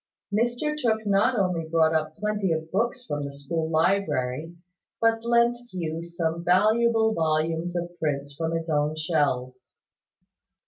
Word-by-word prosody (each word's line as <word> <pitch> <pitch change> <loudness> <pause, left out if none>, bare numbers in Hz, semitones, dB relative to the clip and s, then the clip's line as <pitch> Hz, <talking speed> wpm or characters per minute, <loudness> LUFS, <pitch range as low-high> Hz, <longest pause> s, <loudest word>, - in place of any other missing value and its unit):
Mr 240 +7 0
Tooke 220 -6 0
not 205 +4 +3
only 180 -5 0
brought 160 -1 +3
up 155 -1 -1
plenty 210 -2 -1
of 160 0 -2
books 235 +5 -1
from 145 -7 -3
the 140 - -5
school 160 +3 -3
library, 160 -3 0 0.4
but 225 0 +2
lent 235 0 +3
Hugh 165 -2 -4
some 170 -1 -3
valuable 220 +5 +3
volumes 160 +1 0
of 175 0 -4
prints 145 -2 -2
from 160 +2 -2
his 165 0 -3
own 150 -1 +1
shelves. 145 -6 -1
170 Hz, 140 wpm, -26 LUFS, 155-215 Hz, 0.4 s, not